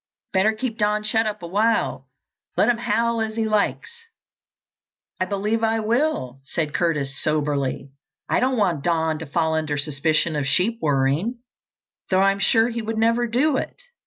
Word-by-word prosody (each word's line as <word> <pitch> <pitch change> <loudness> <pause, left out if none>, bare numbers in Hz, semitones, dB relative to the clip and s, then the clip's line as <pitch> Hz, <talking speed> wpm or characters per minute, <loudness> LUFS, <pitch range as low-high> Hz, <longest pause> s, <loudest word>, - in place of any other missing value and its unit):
Better 195 +3 +3
keep 225 +1 -4
Don 210 0 +1
shut 220 +1 +2
up 210 -3 -4
awhile, 170 - 0 0.5
let 215 - +4
him 235 -1 +1
howl 235 -1 0
as 220 0 -2
he 225 -1 0
likes." 220 - -1 1.1
"I 185 - +1
believe 210 +4 -1
I 225 0 +2
will," 220 - -1
said 150 +2 -3
Curtis 145 -6 -1
soberly. 145 -3 -1 0.4
"I - - +2
don't 255 +1 +1
want 175 -9 +1
Don 160 -2 0
to 160 - -7
fall 160 +2 0
under 155 -2 -1
suspicion 155 +2 0
of 145 -2 -1
sheep 200 - +2
worrying, 150 - 0 0.7
though 185 0 +3
I'm 195 0 +3
sure 225 +4 +3
he 235 -1 -3
would 220 0 -4
never 230 +2 +2
do 265 +5 +2
it. - - -5
200 Hz, 160 wpm, -23 LUFS, 155-225 Hz, 1.1 s, let